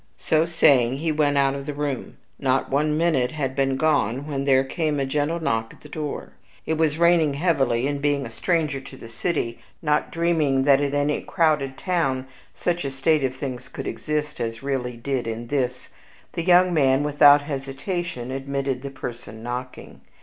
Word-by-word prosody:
So 160 +1 +1
saying, 135 -7 +4
he 160 +2 -1
went 145 -2 +2
out 135 -1 +3
of 140 +1 -6
the 150 - -4
room. 145 -3 -4 0.2
Not 135 -1 0
one 150 +2 +1
minute 155 -7 +2
had 140 -4 -2
he - - -15
been 135 -1 +1
gone 140 -4 +1
when 140 -2 -3
there 135 -1 +4
came 150 +1 -1
a 135 - 0
gentle 150 +5 -1
knock 115 -8 -1
at - - -25
the 150 - -13
door. 150 -1 -5 0.3
It 160 - 0
was 160 -1 +1
raining 170 -4 +4
heavily, 135 -7 +1
and, 140 0 -2
being 145 -1 +1
a 115 - -8
stranger 155 0 0
to 135 0 -12
the 115 - -10
city, 115 0 -2 0.2
not 150 -2 0
dreaming 160 -6 +1
that 140 0 +5
in 145 0 -1
any 145 +1 +1
crowded 150 -5 +1
town 135 -8 0 0.3
such 175 -2 -1
a 140 - -2
state 135 +3 +1
of 130 -1 -1
things 130 -2 -5
could - - -7
exist 150 0 -3
as 115 +1 -4
really 125 -3 -2
did 130 0 -2
in 115 +1 -4
this, 125 -3 -2 0.4
the - - -2
young 180 +1 +5
man, 135 -3 +3
without 145 0 +6
hesitation, 135 0 -4
admitted 135 -1 -2
the 140 - -5
person 120 -4 -8
knocking. 125 +1 -6
140 Hz, 185 wpm, -24 LUFS, 130-155 Hz, 0.4 s, without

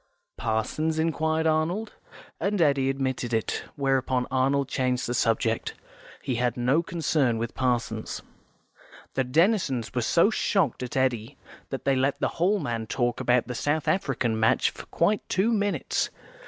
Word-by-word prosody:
"Parsons?" 115 +9 -1
inquired 160 0 0
Arnold, 165 +7 0 0.5
and 200 0 0
Eddy 140 -4 +3
admitted 130 -3 -1
it, 110 - -2
where 135 -2 +2
upon 125 -1 -1
Arnold 135 +1 +2
changed 130 -2 0
the 120 - -2
subject; 115 -1 0 0.5
he 130 - -1
had 125 0 0
no 125 +6 +2
concern 155 -8 0
with 115 0 -3
Parsons. 125 -2 -2 0.9
The 130 - +1
Denisons 150 - +1
were 125 - 0
so 170 - +3
shocked 190 - +1
at 125 +1 -4
Eddy, 120 -4 0 0.3
that - - -5
they 135 - +3
let 135 +2 +1
the - - +1
Hall 190 +5 +3
man 115 - -3
talk 120 0 -1
about 125 0 +2
the 125 - -5
South 145 +5 -1
African 130 -11 0
match 110 - +3
for - - -11
quite 200 +5 +1
two 210 +5 +2
minutes. 205 -2 0
135 Hz, 155 wpm, -26 LUFS, 120-160 Hz, 0.9 s, Eddy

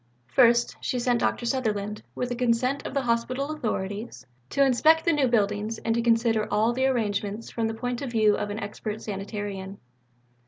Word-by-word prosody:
First, 235 - +3
she 255 - -1
sent 245 -1 +1
Dr. 240 - 0
Sutherland 215 -5 -1
with 250 - -2
the 245 - -2
consent 250 +3 0
of - - -8
the 275 - +1
hospital 255 +4 -1
authorities 220 -6 -4 0.2
to 275 - +3
inspect 310 +5 +4
the 335 - +4
new 285 -3 +2
buildings 210 -1 0
and 225 - -1
to 235 - +1
consider 230 -2 +2
all 220 +3 +2
the 260 +2 +1
arrangements 210 -3 -2
from 230 -1 -1
the 225 - -3
point 245 +1 -3
of 275 - -3
view 215 -3 +3
of 205 - -3
an 205 - -4
expert 210 +1 -5
sanitarian. 200 -1 -5
230 Hz, 185 wpm, -26 LUFS, 210-250 Hz, 0.2 s, inspect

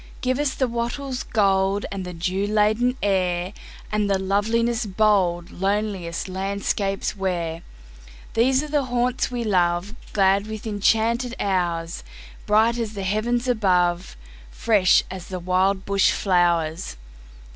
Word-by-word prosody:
Give 255 +1 0
us 290 -2 0
the 260 - +1
wattle's 245 +3 -3
goldAnd 195 -2 0
the 180 - -6
dew 185 +4 -1
laden 215 +4 +2
air, 185 -2 0 0.4
And 210 -1 0
the 195 - +2
loveliness 225 +4 0
boldLoneliest 195 -2 0
landscapes 195 +1 -2
wear. 170 -4 -2 0.7
These 260 +4 +3
are - - -5
the 290 -2 0
haunts 245 0 0
we 245 -1 -3
love, 180 -1 +1 0.2
Glad 195 0 +2
with 220 0 -7
enchanted 225 +4 +1
hours, 175 -4 -1 0.4
Bright 220 +3 +3
as 220 -2 -3
the 195 - -4
heavens 235 +6 0
above, 180 - +1 0.3
Fresh 190 - +3
as 185 -2 -7
the 185 -1 -5
wild 185 +2 +1
bush 200 -1 +3
flowers. 170 - +1
200 Hz, 125 wpm, -23 LUFS, 185-230 Hz, 0.7 s, These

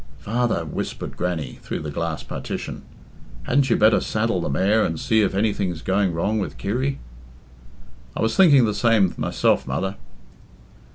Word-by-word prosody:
"Father," 115 -5 -1
whimpered 75 - -5
Grannie, 85 -7 -3
through - - -5
the 75 -1 -5
glass 85 +1 -3
partition, - - -6 0.6
"hadn't 135 +1 +2
you - - +4
better 110 0 +5
saddle 110 -4 -1
the - - -2
mare 100 +10 +2
and 80 -1 -2
see 110 -1 +2
if 100 -2 0
any 105 +1 +2
thing's 90 -6 -3
going 95 0 +1
wrong 100 +7 -1
with 75 -9 -4
Kirry?" 130 - -1 1.2
"I - - -2
was 110 0 +1
thinking 145 -10 +6
the 105 - 0
same 105 -4 +3
myself, - - +1
mother." 95 +9 -2
100 Hz, 160 wpm, -23 LUFS, 85-115 Hz, 1.2 s, thinking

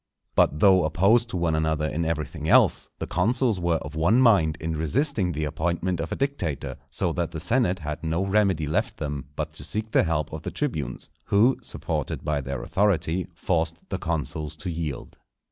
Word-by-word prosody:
But 75 - +3
though 95 -3 +6
opposed 100 +10 +3
to 95 - -3
one 85 -2 +1
another 80 -1 +1
in 85 +2 -2
everything 80 -2 -3
else, - - +4
the - - -4
consuls 115 +3 +1
were 85 -1 +1
of - - -8
one 85 +10 +3
mind 95 -11 +4
in 80 0 -3
resisting 95 - 0
the 75 -1 -2
appointment 85 +3 -1
of 80 0 -4
a - - -1
dictator; 135 - -2
so 85 - -1
that 85 -1 -1
the 80 0 -6
senate 95 +2 +2
had 75 -2 -5
no 80 +4 0
remedy 95 -5 +2
left 75 - -1
them 75 -3 -4
but 75 0 -3
to 75 -2 -11
seek 110 +7 -3
the - - +5
help 75 -3 -1
of - - -5
the - - -4
tribunes, - - -4
who, 115 +6 +3
supported - - -4
by 75 -2 0
their 70 -1 -4
authority, 95 -3 +1
forced 80 -1 0
the 95 - -3
consuls 80 -2 -3
to 85 +3 -5
yield. 80 -6 -5
85 Hz, 190 wpm, -25 LUFS, 75-95 Hz, -, though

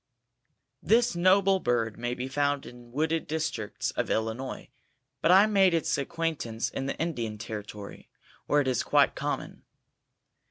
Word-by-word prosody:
This 235 -1 +3
noble 190 +2 +4
bird 115 - 0
may 120 +1 -2
be 125 +1 -4
found 145 +1 0
in 120 -1 -13
wooded 160 +4 -1
districts 155 -9 -3
of - - -2
Illinois, 115 +4 -3 0.5
but - - +2
I 190 +3 +8
made 195 -4 +4
its 165 - +1
acquaintance 140 -6 -2
in 135 - -3
the - - -3
Indian 120 -10 -3
Territory, 105 -1 -8 0.4
where 145 0 +3
it 135 - -2
is 130 -2 +1
quite - - +3
common. - - -4
140 Hz, 145 wpm, -28 LUFS, 120-165 Hz, 0.5 s, I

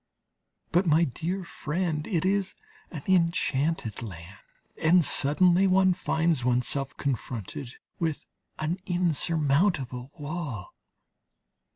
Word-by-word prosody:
But, 180 +2 +2
my 160 +2 +4
dear 170 +6 -3
friend, 160 -1 -3
it 180 -5 0
is 195 0 0 0.3
an 150 -5 -8
enchanted 165 - +1
land, 95 -3 -9 0.4
and 165 +1 +5
suddenly 175 +8 +4
one 190 0 +4
finds 165 -5 0
oneself 125 +2 +1
confronted 125 -1 -4 0.2
with 160 -3 -2 0.3
an 160 +4 -2
insurmountable 155 - +1
wall. 145 - -5
160 Hz, 95 wpm, -27 LUFS, 135-175 Hz, 0.4 s, and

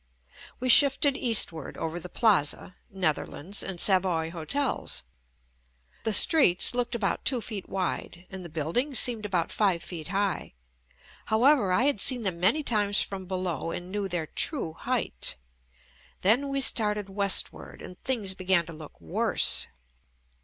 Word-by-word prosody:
We 255 - -3
shifted 275 +2 +5
eastward 205 - +1
over 165 +2 -5
the 180 - -9
Plaza, 180 -6 0
Netherlands 185 +1 -2
and 190 -3 -5
Savoy 180 -4 +2
hotels. 175 - -3 1.0
The 220 - 0
streets 215 - +5
looked 245 0 -2
about 215 -4 -2
two 255 -2 0
feet 210 -4 -7
wide 180 -1 -4
and 190 -1 -8
the 170 - -9
buildings 170 - -1
seemed 225 -4 +1
about 180 -4 -2
five 190 -6 0
feet 165 -4 -7
high; 195 - -3 0.7
however 235 -2 +2
I 205 +7 +2
had 280 -5 +1
seen 245 +2 +1
them 185 -4 -3
many 220 - +2
times 205 -5 0
from 190 -2 -8
below 180 -4 -4
and 175 +2 -7
knew 205 -1 -3
their 175 -3 -3
true 200 - -2
height. - - -3 0.9
Then 245 +9 +3
we 275 0 -2
started 210 -6 +2
west 200 0 +3
ward - - -13
and 180 - -12
things 220 -8 -1
began 185 -2 0
to 165 - -10
look 155 -1 -13
worse. 80 -1 +3
195 Hz, 145 wpm, -26 LUFS, 175-235 Hz, 1.0 s, shifted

